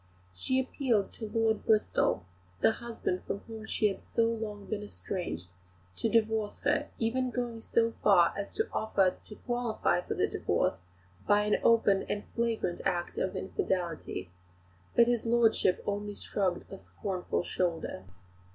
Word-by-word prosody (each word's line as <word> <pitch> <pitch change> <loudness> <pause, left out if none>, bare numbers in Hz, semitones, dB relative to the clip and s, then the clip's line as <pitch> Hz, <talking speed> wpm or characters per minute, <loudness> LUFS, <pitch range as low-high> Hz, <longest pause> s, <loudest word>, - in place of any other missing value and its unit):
She 260 - +1
appealed 255 -5 0
to 220 -2 -6
Lord 225 -1 +1
Bristol, 210 - +2 0.3
the - - +5
husband 225 -6 -3
from 200 - -3
whom 220 -1 -9
she 215 - +2
had 195 - -3
so 230 - 0
long 220 -3 -2
been 210 0 -3
estranged, 175 - -5 0.5
to - - +1
divorce 220 -2 +1
her, - - +1
even 255 +3 0
going 240 -2 -3
so 230 0 +2
far 180 -5 +5
as 200 0 -5
to 440 - 0
offer 195 -4 +2
to 210 - -11
qualify 240 -7 0
for - - -4
the - - +2
divorce - - +1 0.5
by 205 0 +5
an 210 0 +2
open 215 -4 +4
and 205 - -1
flagrant 230 -6 0
act 175 -1 -1
of 190 - -1
infidelity; 170 - -2 0.6
but 235 - +7
his 235 -1 0
lordship 230 -5 +3
only 205 0 -2
shrugged 190 -4 -1
a 195 - -7
scornful 185 -3 -3
shoulder. 170 - -2
210 Hz, 150 wpm, -31 LUFS, 190-230 Hz, 0.6 s, but